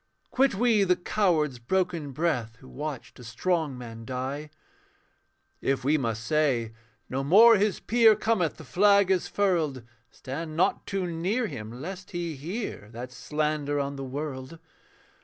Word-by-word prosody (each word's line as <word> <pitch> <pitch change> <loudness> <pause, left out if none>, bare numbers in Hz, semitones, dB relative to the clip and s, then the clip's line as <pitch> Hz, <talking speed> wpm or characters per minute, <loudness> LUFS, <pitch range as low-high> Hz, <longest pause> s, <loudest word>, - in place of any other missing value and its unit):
Quit 265 -3 +3
we 225 -1 +3
the 180 -1 +3
coward's 165 - +1
broken 170 +2 -1
breath 125 -7 -1
Who 130 +3 -16
watched 135 -6 -6
a - - -10
strong 150 +4 -1
man 115 -2 -8
die. 130 +5 -4 1.1
If 135 -1 0
we 145 +4 +3
must 115 -6 -1
say, 130 -6 +1 0.3
'No 135 +1 -2
more 220 +10 +8
his 205 0 +1
peer 225 -2 +5
Cometh; 215 -6 0
the - - -10
flag 200 - +4
is 185 -2 +1
furled.' 165 -10 0 0.3
Stand 155 +7 -6
not 185 +3 +1
too 195 -2 -1
near 180 +8 -1
him, 110 - -6
lest 185 +1 -7
he 170 -3 -4
hear 160 - -5
That 125 +2 -7
slander 150 +2 -1
on 140 0 -2
the 135 - -6
world. 135 +2 -5
155 Hz, 150 wpm, -27 LUFS, 130-185 Hz, 1.1 s, more